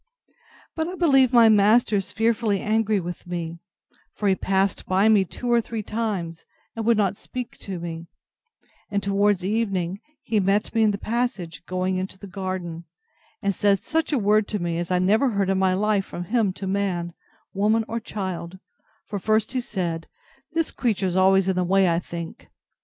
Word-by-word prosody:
But 320 0 -1
I 360 - -5
believe 270 -8 +4
my 235 -3 +7
master 215 +1 +4
is 195 -1 -3
fearfully 225 -2 +1
angry 215 -1 +1
with 175 0 -7
me; 170 -1 -4 0.6
for 210 - -1
he 195 - +5
passed 190 +1 0
by 190 +3 +3
me 215 -3 +5
two 240 +7 -4
or 235 -1 +4
three 225 -1 -5
times, 200 -7 -3 0.3
and 225 -1 -3
would 235 -2 +4
not 200 -2 +1
speak 250 +3 -7
to 190 -2 -6
me; 165 0 -6 0.8
and 200 -1 -1
towards 200 -1 +2
evening, 195 -4 -1 0.2
he 220 - +1
met 200 +2 +1
me 225 - +2
in 215 - +5
the 200 - -1
passage, 200 -9 -3
going 185 0 -1
into 190 +1 -4
the 200 - -10
garden, 185 -3 -5 0.6
and 200 0 +1
said 200 +1 +3
such 320 +10 -1
a 290 - +2
word 210 -1 +3
to 210 - -2
me 170 -2 -2
as 175 - -3
I 180 - +2
never 215 +9 +3
heard 200 -3 0
in 190 - +1
my 190 -1 +3
life 205 0 +1
from 175 - -6
him 215 +1 +1
to 195 - -7
man, 185 -3 -1 0.4
woman, 215 +3 +2
or 230 +1 -3
child; 185 -5 -5 0.5
for 205 - -4
he - - -24
first 215 0 +2
said, 185 -10 -3 0.5
This 330 -1 0
creature's 195 -7 -1
always 190 0 +4
in 190 - +1
the 180 - +1
way, 190 +1 +3
I 170 -1 +2
think. 170 -1 -8
200 Hz, 185 wpm, -24 LUFS, 185-220 Hz, 0.8 s, my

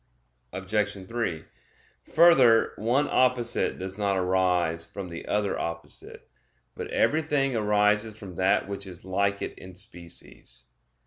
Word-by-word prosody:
Obj. 100 0 -2
3: 100 -9 -3 0.6
Further, 135 -9 +5
one 125 +7 +1
opposite 125 -2 +2
does 95 +2 -6
not 100 -2 +1
arise 90 -3 +1
from 90 +3 -8
the 85 0 -8
other 105 -1 0
opposite; 85 0 -6 0.5
but - - -6
everything 145 -4 +1
arises 105 0 +2
from 100 -4 -9
that 95 +2 +2
which 100 0 -6
is 90 -1 -11
like 100 +1 0
it - - -5
in 95 -1 -11
species. 90 - -8
100 Hz, 125 wpm, -27 LUFS, 95-115 Hz, 0.6 s, Further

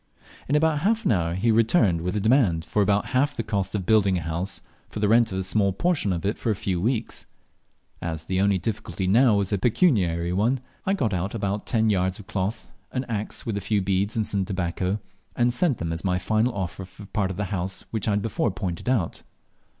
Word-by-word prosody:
In 145 - +2
about 155 0 +3
half 220 +7 +1
an - - +3
hour 85 -4 +1
he 115 +5 +2
returned 110 - +3
with 90 +3 -2
a - - +1
demand 105 - +3
for 105 - 0
about 100 0 +2
half 145 +3 +2
the - - -1
cost 100 -2 -2
of 95 -3 -2
building 100 -3 +3
a - - -2
house, 85 +5 -2 0.3
for - - -6
the 105 - +2
rent 115 +1 +4
of 95 - -3
a 95 - -1
small 100 +1 +1
portion 155 - +1
of 85 -1 -2
it 105 - -1
for - - -2
a 110 - +2
few 95 -4 -2
weeks. 115 +2 -2 0.7
As 80 -2 -4
the 95 +1 0
only 100 -1 +3
difficulty 95 0 -3
now 115 +4 +5
was 100 0 0
a 100 - +1
pecuniary 95 - +2
one, 115 +8 +1 0.3
I 195 - +3
got 115 - 0
out 95 +4 -2
about 100 -1 -2
ten 110 -2 +2
yards 95 -1 0
of 105 - -11
cloth, 105 +1 -3 0.2
an 130 - -2
axe, 110 -3 -4
with 110 -3 -2
a - - -2
few 105 +2 +1
beads 100 +2 0
and 110 -2 +1
some 100 -1 -1
tobacco, 90 +1 -2 0.4
and 120 0 +2
sent 140 -1 +1
them 80 0 -3
as 80 - -5
my 90 -2 +1
final 110 +6 +1
offer 95 -1 -4
for 95 +2 -12
the - - -11
part 100 -3 0
of 95 - -5
the 105 - -1
house 95 +1 -3
which 110 -2 -2
I - - +3
had 100 0 0
before 115 +1 0
pointed 95 +1 -4
out. 110 -11 0
100 Hz, 235 wpm, -25 LUFS, 95-115 Hz, 0.7 s, now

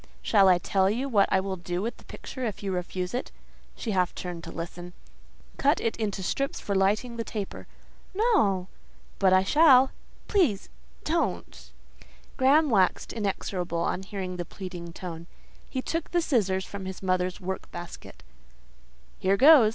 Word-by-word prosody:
"Shall 195 -3 +5
I 180 - +6
tell 190 +2 +1
you 245 +6 -1
what 210 -7 +3
I 190 - +4
will 190 0 -3
do 175 0 -3
with 230 - -3
the - - -18
picture 260 - -8
if 215 -3 -3
you 195 - -2
refuse 180 +1 -3
it?" 250 - -3 0.4
She 225 - -4
half 180 -2 +1
turned 175 -2 -6
to - - -7
listen. 175 +1 -7 0.6
"Cut 285 +4 +3
it 230 - -1
into 205 -3 -3
strips 275 +8 -1
for 200 - -3
lighting 210 +5 +1
the 230 - -2
taper." 210 -3 -6 0.5
"No!" 370 - +2 0.5
"But 190 - +4
I 185 0 +5
shall." 265 +2 +6 0.4
"Please—don't." 65 - -2 0.7
Graham 285 +3 +4
waxed 190 -4 +2
inexorable 190 -5 -2
on 185 - -1
hearing 190 -2 -5
the 175 - -2
pleading 175 -1 -8
tone; 170 -1 -7 0.4
he 260 -1 -3
took 330 -1 -3
the 345 - +2
scissors 190 - +1
from 200 -1 -7
his 190 +1 -7
mother's 185 0 0
work 190 0 -5
basket. 175 -1 -9 1.0
"Here 195 +1 +2
goes!" 275 -4 +8
195 Hz, 160 wpm, -27 LUFS, 180-235 Hz, 1.0 s, goes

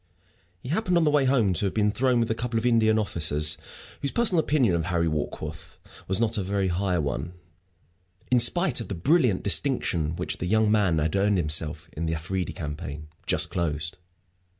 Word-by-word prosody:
He 125 - -7
happened 180 +1 +1
on 170 - +3
the 150 - +3
way 145 -2 +3
home 120 -8 +2
to 90 - +1
have 95 - -5
been 105 -1 +2
thrown 125 +2 +1
with 115 -1 0
a - - +3
couple 115 0 -3
of 115 - -1
Indian 110 -2 +3
officers 75 -7 +1 0.5
whose 140 - 0
personal 210 -5 +2
opinion 145 - +2
of 85 -1 0
Harry 85 -2 0
Warkworth 75 +1 -5 0.3
was 95 0 +1
not 115 -2 0
a - - -1
very 95 0 -1
high 90 +1 0
one, 75 +3 -3 1.0
in 125 - +5
spite 130 +2 +2
of - - -7
the 100 - -4
brilliant 125 - +2
distinction 95 - 0
which - - -4
the 90 - -3
young 110 +2 +2
man 100 -6 +2
had 80 +2 0
earned 100 0 +2
for - - +2
himself 75 0 0
in 80 +1 -3
the 80 - -1
Afridi 90 +3 -3
campaign 75 0 -7 0.2
just - - +2
closed. 85 +1 -2
95 Hz, 195 wpm, -26 LUFS, 80-120 Hz, 1.0 s, in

